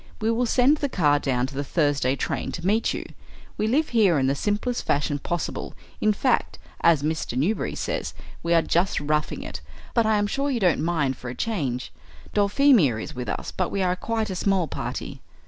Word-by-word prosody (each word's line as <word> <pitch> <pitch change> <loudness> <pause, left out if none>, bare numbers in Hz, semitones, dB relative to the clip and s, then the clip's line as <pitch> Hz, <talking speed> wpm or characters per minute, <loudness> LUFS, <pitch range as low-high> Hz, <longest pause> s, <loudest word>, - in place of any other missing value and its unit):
We 225 0 +1
will 240 +2 +1
send 260 +6 +4
the 285 -2 -1
car 145 - +3
down 125 -3 0
to 135 - -8
the 140 +1 -2
Thursday 145 -4 +1
train - - -3
to 170 - -5
meet 215 +4 +2
you. - - -4 0.5
We 215 - 0
live 290 +7 +2
here 205 -9 +4
in 135 - +2
the 135 - +2
simplest 210 - -1
fashion 145 0 0
possible; 175 +4 -4 0.2
in 215 - +3
fact, 245 +4 0 0.2
as 160 -4 +4
Mr. 155 -5 -2
Newberry 180 +12 0
says, - - -3 0.3
we 170 0 +2
are 165 - +4
just 175 +3 +1
roughing 150 +1 -1
it, - - -7 0.3
but 230 -2 +3
I 220 - +3
am 205 - +1
sure 275 +7 -1
you 255 -4 0
don't 180 -5 +2
mind 155 -5 0
for 125 - -7
a 125 - -6
change. 135 - -2 0.4
Dulphemia 205 - +4
is - - -6
with 125 0 -5
us, - - -4
but 185 - -1
we 195 - -1
are 180 0 +1
quite 220 +2 -2
a - - -3
small 190 -2 +1
party." - - -5
180 Hz, 205 wpm, -25 LUFS, 145-220 Hz, 0.5 s, send